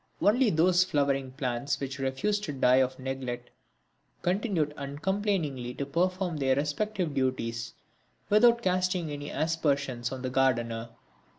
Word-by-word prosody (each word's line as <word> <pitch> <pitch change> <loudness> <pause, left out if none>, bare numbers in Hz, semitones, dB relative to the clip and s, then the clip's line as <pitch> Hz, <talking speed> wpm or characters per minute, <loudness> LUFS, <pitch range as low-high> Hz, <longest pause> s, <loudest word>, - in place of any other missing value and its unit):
Only 235 +3 +4
those 175 +1 +4
flowering 140 -6 0
plants 135 +1 -2
which 135 0 -5
refused 170 +11 0
to 150 - -3
die 130 -1 +4
of 130 0 +2
neglect 130 -2 -5 0.7
continued 180 -5 0
uncomplainingly 145 - -2
to 140 - -3
perform 180 +3 0
their 135 -2 +2
respective 165 +4 -1
duties 120 -4 -2 0.5
without 235 +3 +5
casting 180 -3 0
any 145 0 -5
aspersions 140 -6 -1
on 130 -1 -6
the 130 - -2
gardener. 120 -3 +1
145 Hz, 125 wpm, -29 LUFS, 130-180 Hz, 0.7 s, without